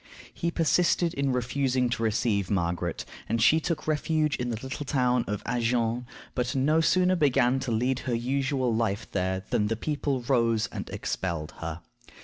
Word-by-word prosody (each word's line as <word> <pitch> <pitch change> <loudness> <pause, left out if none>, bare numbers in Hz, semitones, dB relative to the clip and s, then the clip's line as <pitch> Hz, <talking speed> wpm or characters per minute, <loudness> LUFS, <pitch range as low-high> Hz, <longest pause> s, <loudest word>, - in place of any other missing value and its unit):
He 170 - -1
persisted 170 +1 +2
in 140 -1 0
refusing 125 +1 0
to 120 - -2
receive 105 -3 +1
Margaret, 85 -3 -1 0.2
and 115 - +1
she 150 +8 +5
took 165 -2 -3
refuge 155 -1 +1
in 125 0 -2
the 115 - -2
little 135 +2 -4
town 125 -3 +1
of 105 0 -3
Agen, 120 0 0 0.3
but 125 +2 -1
no 150 +5 +3
sooner 185 +3 +3
began 135 -5 +3
to 130 -2 -3
lead 125 +3 +1
her 125 -4 -2
usual 130 +1 0
life 110 -1 0
there 95 0 -1
than 105 - +2
the 115 - 0
people 140 +1 -2
rose 115 -3 +2
and - - -6
expelled 85 -5 -3
her. 80 +1 -5
125 Hz, 165 wpm, -27 LUFS, 115-140 Hz, 0.3 s, she